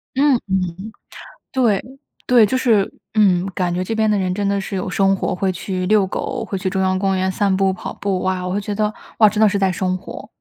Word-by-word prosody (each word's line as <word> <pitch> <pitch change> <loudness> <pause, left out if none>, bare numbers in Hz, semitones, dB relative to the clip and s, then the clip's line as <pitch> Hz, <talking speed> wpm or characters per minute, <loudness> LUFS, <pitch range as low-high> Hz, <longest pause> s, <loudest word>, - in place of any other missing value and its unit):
嗯 280 0 +4
嗯， 190 +2 -2 0.6
对 230 -7 +2 0.4
对。 240 -3 +6
就 235 +6 -1
是， 225 -6 +2 0.2
嗯， 190 -4 +3
感 180 -2 0
觉 180 +1 -1
这 225 +4 -3
边 220 -1 +2
的 210 - +2
人 185 -2 -1
真 200 +1 -1
的 200 0 0
是 195 - -5
有 190 0 -3
生 195 0 +2
活， 190 - -2
会 190 +1 0
去 185 0 -4
遛 210 -2 +4
狗， 190 - -4
会 195 - -4
去 185 0 -2
中 190 0 -1
央 185 0 +1
公 195 -1 +1
园 190 0 0
散 195 0 +1
步、 195 0 +2
跑 185 - -7
步。 195 -2 -2
哇， 185 -1 -1
我 180 - -2
会 205 - -1
觉 205 +1 -4
得： 210 0 0 0.3
“哇， 215 - +8
真 215 +1 -2
的 215 - +6
是 200 - -1
在 195 -1 +2
生 185 +1 -1
活。” - - -10
195 Hz, 260 characters per minute, -19 LUFS, 185-210 Hz, 0.6 s, 哇